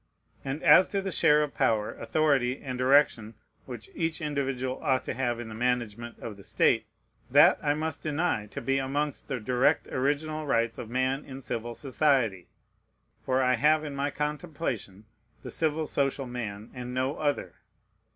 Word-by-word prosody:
And 135 Hz, +3 st, -4 dB
as 185 Hz, -, +7 dB
to 200 Hz, -, -1 dB
the 195 Hz, -, -3 dB
share 150 Hz, -3 st, +4 dB
of 150 Hz, -, -4 dB
power, 110 Hz, -6 st, +1 dB
authority, 140 Hz, -5 st, +1 dB
and 130 Hz, -2 st, -5 dB
direction 125 Hz, -4 st, +3 dB, 0.3 s
which 120 Hz, -4 st, -8 dB
each 165 Hz, -1 st, -2 dB
individual 135 Hz, -4 st, -2 dB
ought 130 Hz, -2 st, +1 dB
to -, -, -3 dB
have 120 Hz, -2 st, -1 dB
in 120 Hz, -, -6 dB
the 110 Hz, -, -8 dB
management 120 Hz, -1 st, -2 dB
of 105 Hz, -3 st, -8 dB
the 100 Hz, -, -13 dB
state, -, -, +2 dB, 0.4 s
that -, -, +6 dB
I 145 Hz, -1 st, +1 dB
must 155 Hz, 0 st, -3 dB
deny 150 Hz, -8 st, -1 dB
to -, -, -7 dB
be 135 Hz, 0 st, +1 dB
amongst 140 Hz, +2 st, -2 dB
the 135 Hz, -3 st, -3 dB
direct 125 Hz, +6 st, +2 dB
original 150 Hz, +3 st, -1 dB
rights 115 Hz, -3 st, +1 dB
of 110 Hz, -, -6 dB
man 130 Hz, +3 st, 0 dB
in 135 Hz, -1 st, -9 dB
civil 120 Hz, -2 st, -4 dB
society; 130 Hz, -, +1 dB, 0.8 s
for 130 Hz, 0 st, +1 dB
I 130 Hz, 0 st, +3 dB
have 150 Hz, +5 st, +3 dB
in 145 Hz, -2 st, -5 dB
my 140 Hz, +1 st, -1 dB
contemplation 150 Hz, -, -4 dB, 0.4 s
the -, -, -6 dB
civil 160 Hz, -1 st, 0 dB
social 140 Hz, -2 st, -1 dB
man, 110 Hz, -4 st, -6 dB
and 125 Hz, 0 st, -6 dB
no 130 Hz, +3 st, -1 dB
other. 145 Hz, -2 st, -1 dB
135 Hz, 170 wpm, -28 LUFS, 120-150 Hz, 0.8 s, as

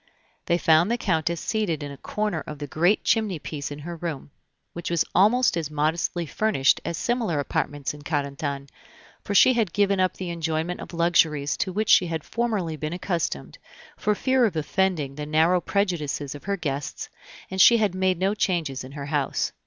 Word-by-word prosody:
They 170 Hz, -, +3 dB
found 165 Hz, +2 st, +4 dB
the 235 Hz, -, +1 dB
Countess 170 Hz, -5 st, 0 dB
seated 195 Hz, -9 st, -1 dB
in 145 Hz, -, -6 dB
a -, -, -8 dB
corner 210 Hz, +2 st, -3 dB
of 150 Hz, -, -6 dB
the 145 Hz, -, -5 dB
great 175 Hz, +8 st, +2 dB
chimney 215 Hz, -6 st, +1 dB
piece 145 Hz, -2 st, -6 dB
in 145 Hz, -, -7 dB
her 175 Hz, 0 st, -5 dB
room, 160 Hz, -4 st, -5 dB, 0.4 s
which 170 Hz, -, -5 dB
was 170 Hz, -1 st, +1 dB
almost 240 Hz, +4 st, +4 dB
as 165 Hz, -3 st, -2 dB
modestly 160 Hz, +3 st, -1 dB
furnished 160 Hz, -5 st, +2 dB
as 170 Hz, -, -3 dB
similar 230 Hz, -10 st, 0 dB
apartments 145 Hz, 0 st, -2 dB
in 150 Hz, -, -11 dB
Carentan; 140 Hz, -1 st, -3 dB, 0.6 s
for 205 Hz, -, -3 dB
she 210 Hz, +6 st, +7 dB
had 225 Hz, -8 st, 0 dB
given 200 Hz, -1 st, +2 dB
up 185 Hz, 0 st, +1 dB
the 180 Hz, -2 st, -5 dB
enjoyment 165 Hz, +1 st, -2 dB
of -, -, -9 dB
luxuries 165 Hz, -4 st, +2 dB
to 185 Hz, -, -1 dB
which 215 Hz, +3 st, -1 dB
she 180 Hz, -, +6 dB
had 160 Hz, -2 st, -3 dB
formerly 215 Hz, -9 st, -2 dB
been 155 Hz, +2 st, -4 dB
accustomed, 165 Hz, -, -3 dB, 0.4 s
for 210 Hz, 0 st, 0 dB
fear 260 Hz, +2 st, +2 dB
of 200 Hz, -7 st, -1 dB
offending 155 Hz, -2 st, 0 dB
the 150 Hz, +1 st, -6 dB
narrow 160 Hz, +4 st, +3 dB
prejudices 160 Hz, -9 st, -1 dB
of 145 Hz, -, -11 dB
her 200 Hz, 0 st, -1 dB
guests, 140 Hz, -5 st, -4 dB, 0.4 s
and 190 Hz, 0 st, +1 dB
she 235 Hz, +5 st, +8 dB
had 210 Hz, -4 st, +1 dB
made 185 Hz, -1 st, +1 dB
no 190 Hz, +3 st, +1 dB
changes 170 Hz, -10 st, -1 dB
in 130 Hz, +1 st, -10 dB
her 140 Hz, -1 st, -6 dB
house. 145 Hz, -1 st, -1 dB
170 Hz, 190 wpm, -25 LUFS, 150-195 Hz, 0.6 s, she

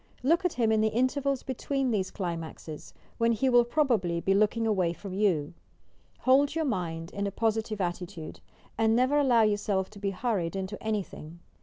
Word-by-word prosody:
Look 335 Hz, +7 st, +3 dB
at 360 Hz, -, +1 dB
him 230 Hz, -3 st, +1 dB
in 220 Hz, -1 st, +3 dB
the 220 Hz, -, +3 dB
intervals 260 Hz, +4 st, 0 dB
between 270 Hz, 0 st, -1 dB
these 190 Hz, -4 st, 0 dB
climaxes, 165 Hz, -4 st, -6 dB, 0.3 s
when 230 Hz, 0 st, +3 dB
he 260 Hz, +4 st, +1 dB
will 245 Hz, -1 st, +6 dB
probably 235 Hz, -, +1 dB
be 195 Hz, +3 st, +1 dB
look 210 Hz, +3 st, +2 dB
ing 230 Hz, -, 0 dB
away 185 Hz, -6 st, +1 dB
from 195 Hz, +2 st, -8 dB
you. 180 Hz, -7 st, +1 dB, 0.7 s
Hold 275 Hz, +3 st, +4 dB
your 325 Hz, -1 st, 0 dB
mind 170 Hz, -, -3 dB
in 200 Hz, 0 st, -2 dB
a -, -, -3 dB
positive 220 Hz, 0 st, -1 dB
at 175 Hz, -1 st, -1 dB
titude, 170 Hz, -3 st, -9 dB, 0.4 s
and 225 Hz, 0 st, +3 dB
never 260 Hz, +4 st, +3 dB
allow 245 Hz, -5 st, +4 dB
yourself 205 Hz, -2 st, 0 dB
to 205 Hz, -, -12 dB
be 200 Hz, 0 st, -1 dB
hurried 195 Hz, -4 st, -2 dB
into 190 Hz, +2 st, -4 dB
any 215 Hz, -2 st, -1 dB
thing! 165 Hz, 0 st, -11 dB
215 Hz, 190 wpm, -28 LUFS, 185-245 Hz, 0.7 s, will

